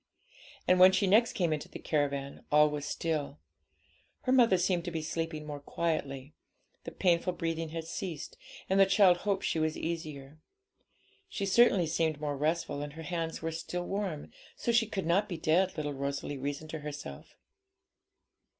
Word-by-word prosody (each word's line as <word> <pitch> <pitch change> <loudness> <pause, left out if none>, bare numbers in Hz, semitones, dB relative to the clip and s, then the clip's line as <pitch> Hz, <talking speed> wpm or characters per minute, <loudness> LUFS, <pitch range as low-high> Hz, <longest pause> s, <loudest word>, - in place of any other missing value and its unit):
And 180 0 +5
when 185 +1 +9
she 200 - +2
next 220 +5 +4
came 170 -4 +1
into 150 - -5
the - - -8
caravan, 140 -2 -2
all 150 0 +6
was 145 -1 -4
still; 155 - -2 0.8
her 255 - -1
mother 235 -7 +5
seemed 175 -1 +1
to - - -2
be 160 -2 -3
sleeping 160 -1 -3
more 145 -1 -6
quietly, 145 -3 -3 0.5
the - - -5
painful 180 0 +1
breathing 165 -1 -3
had 165 +1 -5
ceased, 165 -1 -6 0.3
and 190 +1 +2
the 195 - +7
child 190 -2 +5
hoped 195 +1 -1
she 160 - 0
was 155 0 0
easier. 155 -3 -5 0.9
She 200 - -3
certainly 195 -3 +5
seemed 160 -1 0
more 145 -1 -2
restful, 155 0 -1
and 145 0 -6
her 160 +1 -8
hands 165 -1 -3
were 165 - -1
still 175 +2 -4
warm, 195 -7 -3 0.2
so 235 - -1
she 230 -1 +3
could 195 -4 -3
not 195 +6 +2
be 175 - -3
dead, 170 +4 +2
little 150 -1 -2
Rosalie 140 +1 -3
reasoned 145 +3 -4
to 160 - -4
herself. 145 0 -8
165 Hz, 170 wpm, -31 LUFS, 150-185 Hz, 0.9 s, when